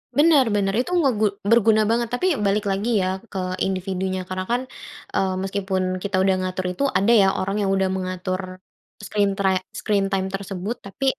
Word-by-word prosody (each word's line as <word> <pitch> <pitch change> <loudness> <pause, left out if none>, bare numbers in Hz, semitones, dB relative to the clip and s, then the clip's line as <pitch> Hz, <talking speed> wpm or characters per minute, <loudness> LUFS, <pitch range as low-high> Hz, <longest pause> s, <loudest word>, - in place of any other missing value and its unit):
Bener 295 -3 +5
bener 195 -1 +1
itu 260 - -2
ngegu 255 -10 +2 0.2
berguna 220 0 +4
banget 235 0 +1
tapi 365 +9 +1 0.2
balik 205 +2 +1
lagi 200 +5 -1
ya - - 0 0.2
ke 195 - -5 0.3
individunya 190 0 -2
karena 185 0 -4
kan, 245 - +2 0.5
eee, 190 -1 +1
meskipun 190 -1 -2
kita 200 -1 -2
udah 190 -1 +3
ngatur 185 0 -3
itu 230 - -3
ada 200 +4 +3
ya 205 -5 +6
orang 195 +2 -2
yang 195 - +1
udah 190 -1 +1
mengatur, 185 0 -3 0.6
screen 200 -1 0
try 190 -2 +2 0.2
screen 200 -2 +1
time 190 -1 0
tersebut 195 +2 -4
tapi 200 +7 -5
195 Hz, 170 wpm, -23 LUFS, 185-215 Hz, 0.6 s, ya